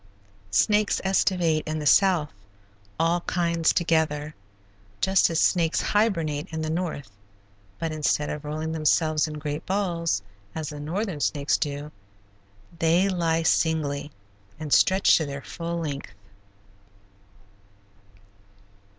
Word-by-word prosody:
Snakes 210 - +2
estivate 180 -4 +2
in 155 0 -2
the 150 - -4
South, 175 - +4 0.7
all 170 +2 +2
kinds 170 -2 +1
together, 155 -3 0 0.7
just 190 - +3
as 165 -1 0
snakes 170 -3 +2
hibernate 170 -8 0
in 160 0 -3
the 155 - -2
North, 160 -7 -3 0.7
but 165 -1 -3
instead 150 -1 0
of 150 0 -5
rolling 155 +2 -4
themselves 155 0 +2
in 155 - -6
great 150 0 -4
balls, 170 - -1 0.3
as 155 -2 -4
the 150 -1 -8
northern 175 +3 -3
snakes 145 0 +1
do, 145 0 -3 0.9
they 170 +4 +3
lie 165 -3 0
singly, 150 -3 +1 0.5
and 155 -2 -2
stretched 190 0 +5
to 160 - -1
their 140 0 -6
full 170 0 -5
length. 145 -4 -4
160 Hz, 115 wpm, -25 LUFS, 150-175 Hz, 0.9 s, stretched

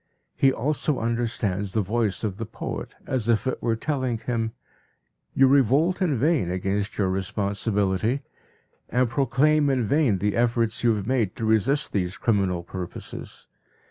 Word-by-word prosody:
He 135 - +4
also 145 +3 -1
understands 110 -4 -1
the 110 - +1
voice 110 +1 -1
of 100 -3 -2
the 115 - -4
poet 110 - -6
as 125 -4 -2
if 115 0 +2
it 130 - -2
were 115 -1 +1
telling 130 -1 -1
him: 115 -1 -2 0.8
"You 135 - +6
revolt 140 - +3
in 160 -8 +2
vain 140 - +2
against 95 +3 -2
your 100 - +2
responsibility, 100 +4 -1 0.7
and 125 +2 +2
proclaim 140 +4 +2
in 130 -3 +1
vain 125 -2 +2
the 105 +2 0
efforts 115 -1 +1
you 115 -2 +4
have 100 -2 -4
made 115 -6 0
to 115 - -3
resist 115 +7 +2
these 90 -1 -1
criminal 95 -6 +1
purposes. 90 0 -8
115 Hz, 150 wpm, -25 LUFS, 100-130 Hz, 0.8 s, You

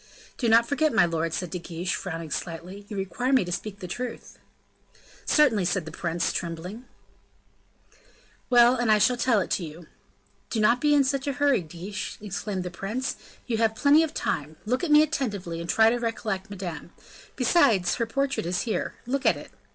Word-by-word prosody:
"Do 235 - 0
not 230 +1 +5
forget, 300 +3 +1
my 205 -6 +5
lord," 165 -1 -1
said 175 +1 -3
De 180 - -3
Guiche, 170 +1 -4
frowning 165 -4 -5
slightly, 180 +6 -6
"you 205 - -5
require 195 +7 -2
me 260 -8 +4
to 175 - -5
speak 200 +3 -4
the 180 - -5
truth." 245 +6 -6 0.9
"Certainly," 235 - +4
said 175 -3 0
the 160 - -7
prince, 170 -1 -2
tremblingly. 180 +8 -5 1.6
"Well, 240 0 +6
and 240 -3 +1
I 215 - +6
shall 250 +5 +3
tell 235 -3 +2
it 185 - -1
you." 165 0 -8 0.6
"Do 225 - -1
not 235 +3 +3
be 295 -1 +4
in 285 - +5
a 275 +1 -1
hurry, 285 -5 +2
Guiche," 175 +5 -6
exclaimed 200 -1 -4
the 180 - -5
prince, 215 +9 -3 0.3
"you 230 -3 -1
have 220 -1 +2
plenty 285 +6 +5
of 320 -2 -2
time; 150 +2 -2
look 250 +7 0
at 350 - -1
me 300 0 +7
attentively, 205 - -3
and 170 - -7
try 220 0 +5
to 245 - 0
recollect 220 -4 -3
Madame. 185 -5 -6 0.5
Besides, 235 - +3
her 230 -2 -1
portrait 275 -5 -1
is 180 +1 0
here. 225 - -2
Look 270 +3 -1
at - - +4
it." - - -11
215 Hz, 185 wpm, -26 LUFS, 175-250 Hz, 1.6 s, me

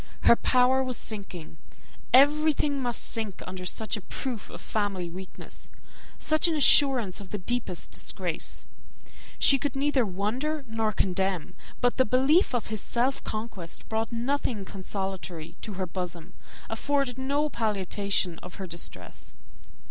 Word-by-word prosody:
Her - - +7
power 255 +2 +3
was 255 -2 -2
sinking; 185 - -7 0.5
everything 290 +1 +4
must 240 -2 -2
sink 220 -5 -4
under 185 0 -6
such 220 +5 -1
a 210 - -5
proof 240 +3 -5
of - - -9
family 195 -5 -2
weakness, 185 +1 -9 0.5
such 310 +2 +3
an 330 - +1
assurance 265 -9 +6
of 195 - -10
the 210 - -3
deepest 205 -2 -2
disgrace. - - -2 0.7
She 275 - +5
could 280 0 -2
neither 275 -1 +2
wonder 240 +10 -2
nor 225 -1 0
condemn; 190 -3 0 0.3
but 245 0 +2
the 260 - +5
belief 265 - +4
of 240 - 0
his 215 - -2
self 250 +3 0
conquest 215 -6 -5
brought 220 +1 -1
nothing 235 -3 -1
consolatory 190 -4 -5
to 215 - -5
her 185 0 -2
bosom, 180 -1 -5 0.3
afforded 265 +2 -1
no 285 +3 +1
palliation 200 - -1
of 180 - -10
her 195 - -5
distress. 170 -1 -5
220 Hz, 140 wpm, -28 LUFS, 190-265 Hz, 0.7 s, Her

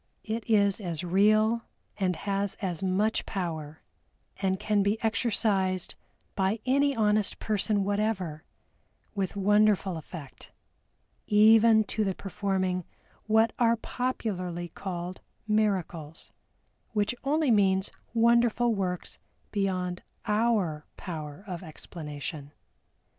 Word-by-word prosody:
It 225 +1 -4
is 200 -1 +3
as 170 -3 -3
real 215 +5 +3 0.3
and 185 -3 0
has 200 +2 -1
as 180 -5 -4
much 195 +4 +1
power, 160 -5 -4 0.5
and 190 -1 0
can 210 -2 +1
be 200 +2 +1
exercised 200 -5 +1 0.4
by 195 +3 0
any 280 +2 +3
honest 210 -2 +2
person 210 -1 0
whatever 195 -6 -1 0.7
with 195 -2 -2
wonderful 205 -2 +3
effect, 155 -3 -10 0.8
even 220 +1 +6
to 215 +1 -1
the 190 -2 -1
performing 190 -2 -1 0.4
what 220 +1 +4
are 230 -1 +4
popularly 185 -9 -3
called 180 0 -6 0.3
"miracles," 185 -7 -1 0.6
which 210 +1 +1
only 295 0 +2
means 190 -2 +3 0.2
wonderful 235 0 +4
works 185 -3 -3 0.3
beyond 185 -3 -1 0.2
our 210 -8 +1
power 155 -2 -6
of 180 -4 -5
explanation. 150 -3 -7
200 Hz, 105 wpm, -28 LUFS, 180-220 Hz, 0.8 s, even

